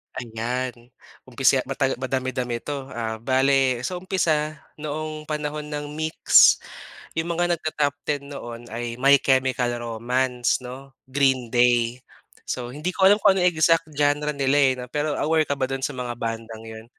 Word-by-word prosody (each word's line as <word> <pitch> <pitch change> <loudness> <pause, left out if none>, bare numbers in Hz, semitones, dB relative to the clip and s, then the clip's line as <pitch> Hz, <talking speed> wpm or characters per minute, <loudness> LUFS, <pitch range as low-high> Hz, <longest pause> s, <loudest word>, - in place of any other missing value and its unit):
Ayan 120 +1 -4 0.4
umpisa, - - +3
mata-madami-dami 130 -2 -2
'to. 140 -2 -5
Ah, 110 -3 -4
bale, 130 0 +2
sa 180 +3 -3
umpisa 155 -5 0 0.2
noong 155 0 -5
panahon 150 0 -3
ng 145 -1 -5
MYX, 155 +1 +5 0.6
'yong 165 - -2
mga 175 0 +1
nag-ta-top 150 -2 -1
ten 145 -1 -1
noon 120 -4 -7
ay, 120 0 -4
My 140 +2 +5
Chemical 130 -2 +1
Romance 120 +2 -1
'no, 130 +2 -10
Green 130 -3 +1
Day. 120 0 +3 0.5
So 125 -1 -4
hindi 155 +7 -4
ko 190 - 0
alam 200 +2 +6
kung 195 -1 +5
ano 180 - +1
exact 165 -2 +3
genre 145 0 +1
nila 140 0 +1
eh, 135 -2 +5
'no, 125 - -6
pero 150 +3 -2
aware 160 0 +2
ka 140 -2 -3
ba 130 - +1
do'n 135 0 -4
sa - - 0
mga 125 -3 -5
bandang 115 -1 -5
'yon? 110 0 -10
135 Hz, 155 wpm, -24 LUFS, 120-150 Hz, 0.6 s, alam